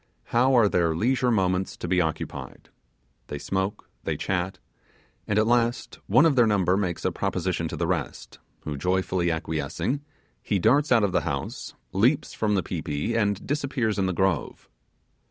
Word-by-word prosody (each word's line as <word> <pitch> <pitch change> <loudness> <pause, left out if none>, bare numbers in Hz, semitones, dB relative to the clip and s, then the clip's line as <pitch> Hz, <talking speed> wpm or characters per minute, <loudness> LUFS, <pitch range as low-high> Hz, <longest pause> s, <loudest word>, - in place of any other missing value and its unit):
How 130 +3 +4
are 115 -3 +6
their 85 -4 +1
leisure 125 +6 +1
moments 95 -4 0
to - - -5
be 90 +1 +3
occupied? 80 -2 -5 0.6
They 75 - -5
smoke, 95 +6 -3 0.2
they - - -2
chat, 90 0 -2 0.7
and 105 - 0
at 110 - +4
last 120 +1 0
one 125 +10 +5
of 155 -4 +4
their 120 -3 +5
number 95 -4 +2
makes 95 -4 -2
a - - +2
proposition - - -1
to - - -6
the - - 0
rest, - - -3 0.2
who 75 -2 -5
joyfully 90 +1 0
acquiescing, 80 - -2 0.4
he 105 - 0
darts 140 - +3
out 115 -3 +5
of 100 - +2
the 90 - +2
house, 75 -4 -4 0.2
leaps 120 +9 +2
from 105 -2 0
the 95 - +1
pi - - -4
pi, 75 +10 -2
and 100 -3 0
disappears 135 -7 -1
in 95 - +2
the - - 0
grove. 95 -3 -1
95 Hz, 170 wpm, -26 LUFS, 90-115 Hz, 0.7 s, are